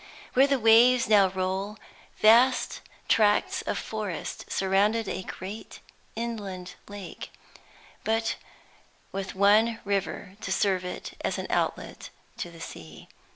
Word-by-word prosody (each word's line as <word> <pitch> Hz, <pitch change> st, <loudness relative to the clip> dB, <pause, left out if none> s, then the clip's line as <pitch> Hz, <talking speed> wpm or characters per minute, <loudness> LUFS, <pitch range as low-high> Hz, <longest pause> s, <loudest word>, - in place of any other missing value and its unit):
Where 270 Hz, +2 st, +5 dB
the 280 Hz, -1 st, +2 dB
waves 240 Hz, +2 st, +6 dB
now 205 Hz, -3 st, +6 dB
roll, 190 Hz, +3 st, -3 dB, 0.4 s
vast 240 Hz, +4 st, +4 dB, 0.3 s
tracts 210 Hz, -2 st, +3 dB
of -, -, -3 dB
forest 210 Hz, -5 st, -5 dB
surrounded 200 Hz, +3 st, +2 dB
a 190 Hz, -, -3 dB
great 195 Hz, +3 st, -8 dB, 0.4 s
inland 200 Hz, -6 st, -5 dB
lake, 205 Hz, -3 st, -8 dB, 0.7 s
with 225 Hz, 0 st, 0 dB, 0.8 s
but 195 Hz, -1 st, -4 dB
one 215 Hz, +4 st, +4 dB
river 200 Hz, -1 st, -2 dB
to 185 Hz, -, -4 dB
serve 190 Hz, -1 st, +1 dB
it 180 Hz, -, -6 dB
as -, -, -1 dB
an -, -, -4 dB
outlet -, -, -2 dB, 0.3 s
to 175 Hz, -, -4 dB
the 170 Hz, -1 st, -14 dB
sea. 80 Hz, -, -10 dB
205 Hz, 120 wpm, -27 LUFS, 190-225 Hz, 0.8 s, waves